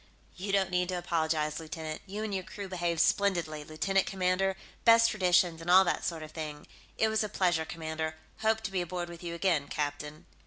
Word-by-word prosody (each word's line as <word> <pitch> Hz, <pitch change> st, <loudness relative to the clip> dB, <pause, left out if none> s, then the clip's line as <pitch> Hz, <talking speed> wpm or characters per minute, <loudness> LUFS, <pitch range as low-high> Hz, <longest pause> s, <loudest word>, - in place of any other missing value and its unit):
"You 195 Hz, +2 st, -4 dB
don't 195 Hz, -2 st, +2 dB
need 180 Hz, 0 st, +1 dB
to 180 Hz, -, -1 dB
apologize, 160 Hz, -3 st, 0 dB
lieutenant. 160 Hz, -1 st, -6 dB
You 205 Hz, +3 st, -4 dB
and 215 Hz, -2 st, -3 dB
your 190 Hz, -, -1 dB
crew 200 Hz, +2 st, -7 dB
behaved 175 Hz, -3 st, 0 dB
splendidly, 170 Hz, -6 st, +1 dB
lieutenant 190 Hz, +6 st, 0 dB
commander, 190 Hz, 0 st, +1 dB, 0.3 s
best 230 Hz, 0 st, +6 dB
traditions, 180 Hz, -4 st, +3 dB
and 165 Hz, -, -6 dB
all 185 Hz, +2 st, +8 dB
that 175 Hz, -, 0 dB
sort 165 Hz, -2 st, -3 dB
of 155 Hz, -, -9 dB
thing. 150 Hz, -2 st, -6 dB, 0.3 s
It 220 Hz, -, +3 dB
was 220 Hz, 0 st, +1 dB
a 215 Hz, -, -3 dB
pleasure, 175 Hz, -5 st, +1 dB
commander, 160 Hz, -1 st, -4 dB, 0.2 s
hope 220 Hz, 0 st, +2 dB
to 220 Hz, -3 st, -4 dB
be 190 Hz, -2 st, 0 dB
aboard 175 Hz, 0 st, -4 dB
with 170 Hz, -1 st, -10 dB
you 170 Hz, -1 st, -5 dB
again, 170 Hz, -5 st, +1 dB
captain." 150 Hz, +1 st, -4 dB
175 Hz, 200 wpm, -30 LUFS, 160-195 Hz, 0.3 s, all